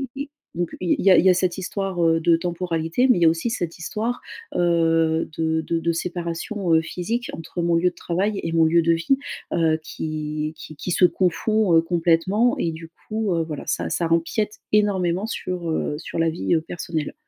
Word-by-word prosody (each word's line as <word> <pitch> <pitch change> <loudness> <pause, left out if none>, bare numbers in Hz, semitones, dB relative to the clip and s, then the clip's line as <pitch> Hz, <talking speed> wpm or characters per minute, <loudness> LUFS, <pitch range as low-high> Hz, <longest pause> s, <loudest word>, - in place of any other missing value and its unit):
i 275 - -4
i 285 - -12 0.3
donc 175 -1 -1
il 175 - +1
y 195 - +4
a - - +7
il - - +4
y - - +7
a - - +7
cette 180 -1 0
histoire, 190 -1 -2
heu, 165 0 +3
de 165 +1 +4
temporalité. 170 +5 0
Mais 250 - +5
il - - -4
y - - +6
a - - +8
aussi 165 +8 -1
cette 175 -5 -3
histoire, 225 +8 -3 0.3
heu, 165 -2 +2
de 160 0 +1
de 165 +1 -1
de 170 +1 0
séparation, 175 +2 -3
heu, 160 - +5
physique 185 +9 -3
entre 165 +2 -5
mon 170 0 +2
lieu 175 +2 +3
de - - -30
travail 195 +4 -1
et 165 - -2
mon 165 -1 +4
lieu 170 +1 +4
de 165 0 +4
vie, 165 +12 +1 0.4
heu, 160 -2 +2
qui 155 -1 -4
qui 155 - -10
qui 180 - -5
se 180 - +5
confond, 185 +3 +1
heu, 165 - +6
complètement. 175 +7 +2
Et 165 - 0
du 160 0 -9 0.2
coup, 215 -3 0
heu, 165 - +1
voilà 155 -2 -6
ça 85 -1 -1
ça 170 - 0
empiète 190 +6 0
énormément 195 -3 +2
sur, 180 -6 -4
heu, 155 - -1
sur 165 - -5
la 165 0 +3
vie, 165 +2 -1
heu, 160 - +1
personnelle. 165 -2 -4
170 Hz, 215 wpm, -23 LUFS, 165-185 Hz, 0.4 s, a